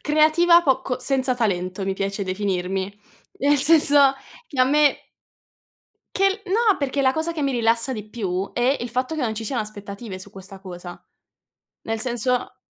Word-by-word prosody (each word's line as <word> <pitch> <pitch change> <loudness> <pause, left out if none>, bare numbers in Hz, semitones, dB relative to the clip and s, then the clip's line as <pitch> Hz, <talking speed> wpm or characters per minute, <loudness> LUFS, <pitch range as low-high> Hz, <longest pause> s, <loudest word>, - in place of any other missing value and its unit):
Creativa 315 +3 +4
poco, 265 -2 0
senza 260 0 0
talento 190 -4 -2
mi 195 - -1
piace 195 +1 -3
definirmi, 190 0 -2 0.4
nel 290 +1 +4
senso 285 -2 +5 0.3
che 275 - -3
a 255 - +7
me 295 +1 +2 1.1
che 390 +2 +1
l 380 - -9
no, 435 -2 +3
perché 280 0 -1
la 260 -1 +3
cosa 320 +2 -2
che 310 -3 -4
mi 275 - +1
rilassa 235 +1 +1
di 215 -3 -7
più 195 -4 -3
è 255 +3 +1
il 240 - -4
fatto 255 +6 -2
che 310 - -2
non 220 -3 -1
ci 225 - -5
siano 240 +2 -2
aspettative 205 -1 -8
su 200 - -11
questa 195 0 -11
cosa, 175 -2 -10 0.8
nel 225 0 -2
senso 250 +1 -1
245 Hz, 170 wpm, -22 LUFS, 200-285 Hz, 1.1 s, a